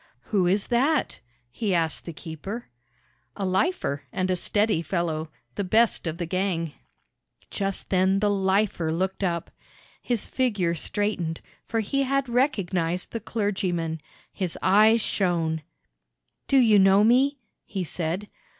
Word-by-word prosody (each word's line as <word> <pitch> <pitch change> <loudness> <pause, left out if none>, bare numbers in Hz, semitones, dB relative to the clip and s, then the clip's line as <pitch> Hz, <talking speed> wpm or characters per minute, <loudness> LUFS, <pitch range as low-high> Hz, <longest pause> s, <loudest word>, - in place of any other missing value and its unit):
"Who 185 +4 +1
is 195 +3 +2
that?" 270 +6 +1 0.3
he 200 - -1
asked 165 -2 0
the 170 - -5
keeper. 170 +8 -7 0.7
"A 200 - -3
lifer, 185 - 0
and 185 0 -1
a - - +2
steady 205 0 +1
fellow 160 -2 -2 0.2
the 205 - -2
best 220 0 +2
of 165 0 -3
the 170 - -2
gang." 170 -3 -1 0.8
Just 195 -1 -3
then 190 +1 +3
the 205 +1 +2
"lifer" 190 -4 +1
looked 190 +4 -1
up. 170 -2 -1 0.5
His 240 -4 -1
figure 205 -10 0
straightened, 170 -2 -1 0.3
for 225 -1 0
he 275 +6 0
had 275 0 +1
recognized 185 - 0
the 230 - -3
clergyman. 185 -7 -2 0.3
His 185 -4 -3
eyes 215 +4 +5
shone. 170 -6 0 0.9
"Do 275 - +4
you 220 -5 +6
know 195 +1 +6
me?" 260 +5 +4 0.3
he 195 -3 -4
said. 175 +4 -3
190 Hz, 135 wpm, -25 LUFS, 170-215 Hz, 0.9 s, you